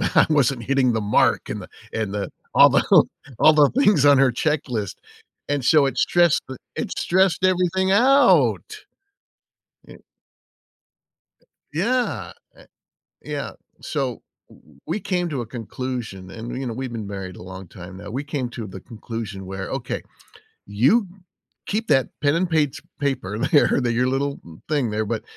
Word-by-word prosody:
I - - +6
wasn't 135 -5 +2
hitting 130 0 +2
the 110 - 0
mark 105 0 +2
and - - -4
the - - -11 0.2
and 110 -3 -2
the 100 -1 -3 0.2
all - - +8
the - - +3 0.6
all 155 - +7
the 150 -2 +5
things 205 - +4
on 145 -1 +7
her 135 -1 +4
checklist, 125 - -2 0.5
and 145 -2 0
so 150 -1 +5
it 135 - -2
stressed 175 -3 +3
the 130 - -7 0.2
it - - -3
stressed 185 0 +2
everything 185 +1 +1
out. 265 +7 +3 1.0
Eh - - -11 1.8
Yeah, 240 +10 -1 0.2
a - - -18 0.6
Yeah, - - -5 0.3
so - - -3 0.6
we 215 - -2
came 180 -3 -1
to 140 -4 -2
a 120 - -5
conclusion, 115 -4 -6
and, 115 +4 -7
you 135 - -4
know, 115 - -3
we've 130 0 -5
been 110 -3 -5
married 95 -2 -7
a - - -11
long 95 +1 -9
time 90 +2 -11
now. 100 +1 -9
We 135 +6 -4
came 140 -4 -3
to 115 -3 -6
the 95 -1 -9
conclusion 110 -3 -7
where, 95 0 -5
"Okay, 130 -3 -4 0.6
you 135 - +2 0.6
keep 220 +3 -2
that 135 -3 +3
pen 145 0 +3
and 175 +1 0
page 150 -4 0 0.2
paper 130 -8 -2
there, 145 +2 +3
that 120 -1 0
your 125 +2 +1
little 140 +2 -1
n 80 -1 -14
thing 145 -6 +1
there, 110 +1 -1
but 110 +1 -3
130 Hz, 160 wpm, -22 LUFS, 110-155 Hz, 1.8 s, all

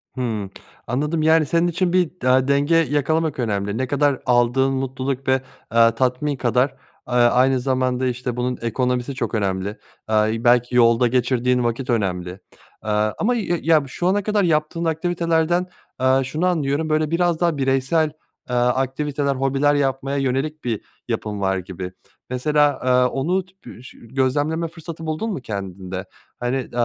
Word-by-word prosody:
Hımm. 110 -6 -3 0.4
Anladım. 150 +6 -1
Yani, 160 0 +4
senin 170 +4 +2
için 175 +1 0
bir 180 -3 +3
da 130 +1 +3
denge 140 +3 +2
yakalamak 155 0 +1
önemli. 100 -3 -1
Ne 130 +1 -1
kadar 145 0 +1
aldığın 125 +2 +3
mutluluk 135 0 -3
ve, - - +4 0.4
eee, 115 0 +6
tatmin 130 +4 0
kadar, 125 +1 +1 0.4
eee, 125 - -5
aynı 125 +2 +4
zamanda 130 0 0
işte 125 -1 -3
bunun 125 +1 -2
ekonomisi 125 +3 -1
çok 130 - -2
önemli, 95 -2 -1 0.4
eee, 110 0 +2
belki 120 0 +3
yolda 120 0 +5
geçirdiğin 125 0 +1
vakit 120 +2 -2
önemli, 95 -6 0 0.6
eee, - - -3 0.3
ama 245 +4 +1
ya 200 -7 -1
ya, 160 -2 +4
şu 175 +7 -2
ana 200 +2 +2
kadar 210 0 +1
yaptığın 165 0 0
aktivitelerden, 170 +1 0 0.3
eee, 130 +1 +4
şunu 155 +6 -2
anlıyorum 155 -3 0
böyle 155 0 +1
biraz 170 -1 +1
daha 170 -3 +1
bireysel, 135 +4 +2 0.4
eee, 125 - -1
aktiviteler 135 +3 0
hobiler 135 +2 +2
yapmaya 135 0 -1
yönelik 135 +3 -1
bir 115 -4 -2 0.3
yapın 105 -1 -3
var 95 0 +1
gibi. 90 0 -6 0.4
Mesela, 145 +2 +2
eee, 130 - +3 0.2
onu 175 +8 0 0.4
ş - - -13
gözlemleme 145 +7 -1
fırsatı 165 0 -9
buldun 160 +9 -2
mu 140 - -5
kendinde? 95 -3 -6 0.3
Hani, 120 +1 -1
eee, 130 - -5
135 Hz, 150 wpm, -21 LUFS, 125-155 Hz, 0.6 s, eee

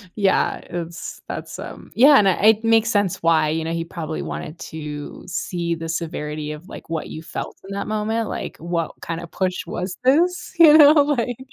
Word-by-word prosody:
yeah 200 -3 +2
it's 170 -1 -6
that's, - - -6
um, - - -9
yeah 280 +4 +7
and 195 -2 +4
I - - +4 0.2
it 220 0 +3
makes 225 0 +3
sense 205 -4 +1
why, 160 -2 +3
you 160 +1 -1
know, 165 - -3
he 165 - -2
probably 165 -2 -5
wanted 155 - -6
to 150 -2 -7
see 170 -1 -2
the 165 0 -6
severity 150 -2 -4
of, 150 +5 -9
like, - - -10
what 160 -2 -3
you 155 - -7
felt - - -4
in 195 - -6
that 200 - -4
moment, 215 +1 -1
like, - - -5
what 170 -1 -2
kinda 170 +1 -4
push 185 +1 -2
was 180 +1 -4
this? 340 +9 +2
You 310 -2 +9
know? 295 -2 +9
Like, 280 -5 +2
175 Hz, 195 wpm, -22 LUFS, 165-225 Hz, 0.2 s, You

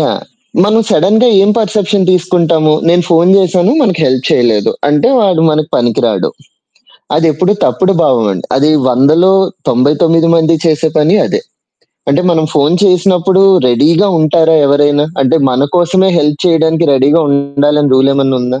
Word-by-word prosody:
Yeah! - - -2 0.4
మనం 220 +2 +1
సడెన్‌గా 215 +7 +1
ఏం 200 - +1
పర్‌సెప్షన్ 205 -2 -1
తీసుకుంటాము, 170 -3 0 0.2
నేను 175 +1 +2
ఫోను 170 +2 +2
జేశాను 185 +2 0
మనకు 190 -10 -1
హెల్ప్ 130 -1 -1
చేయలేదు. 110 -4 0 0.2
అంటే, 150 +9 +1
వాడు 185 -6 0
మనకు 155 0 -2
పనికి 120 -2 -1
రాాడు. 105 -5 -1 0.9
అదెప్పుడు 165 +4 0
తప్పుడు 190 +1 0
భావమండి. 105 -8 -1
అది 150 +3 +1 0.2
100లో 155 +9 +2 0.4
99 160 +6 +1
మంది 165 0 +1
చేసే 160 0 0
పని 160 +7 +2
అదే. 430 - -3 0.7
అంటే, 140 - +1
మనం 160 -2 0
ఫోను 150 +3 +1
చేసినప్పుడు 185 0 +1 0.3
రెడీగా 160 - +1
ఉంటారా 160 +1 +1
ఎవరైనా? 145 +1 +1 0.2
అంటే, 135 +5 +1
మన 130 +2 0
కోసమే 185 +2 +1
హెల్ప్ 150 -1 -1
చేయడానికి, 160 0 0
రెడీగా 140 +5 +1
ఉండాలని 140 +1 -1
రూలేమన్నా 135 0 0
ఉందా? 125 +1 -4
160 Hz, 140 wpm, -10 LUFS, 140-180 Hz, 0.9 s, నేను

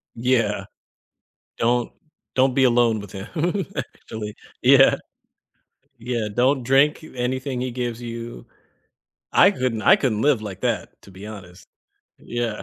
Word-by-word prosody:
Yeah. 120 0 +1 0.9
"Don't 120 +1 +1 0.4
don't 130 0 +3
be 135 - +4
alone 120 -3 +3
with 100 -2 -10
him, 95 0 -7 0.5
actually." 105 -1 -6 0.3
Yeah. - - +6 1.0
Yeah, 120 -2 -2
"Don't 130 +3 +2
drink 135 +5 +3
you - - -12
anything 130 +1 -2
he 130 -1 -2
gives 120 -1 -4
you." 115 - -7 0.9
I 195 - +6
couldn't 125 - -2
I - - +7
couldn't 110 -5 -1
live 140 -6 +3
like 100 -4 -7
that, - - -2
to 100 - -15
be 95 +2 -11
honest. 95 -4 -11 0.5
Yeah. 120 -3 -4
120 Hz, 135 wpm, -23 LUFS, 110-130 Hz, 1.0 s, I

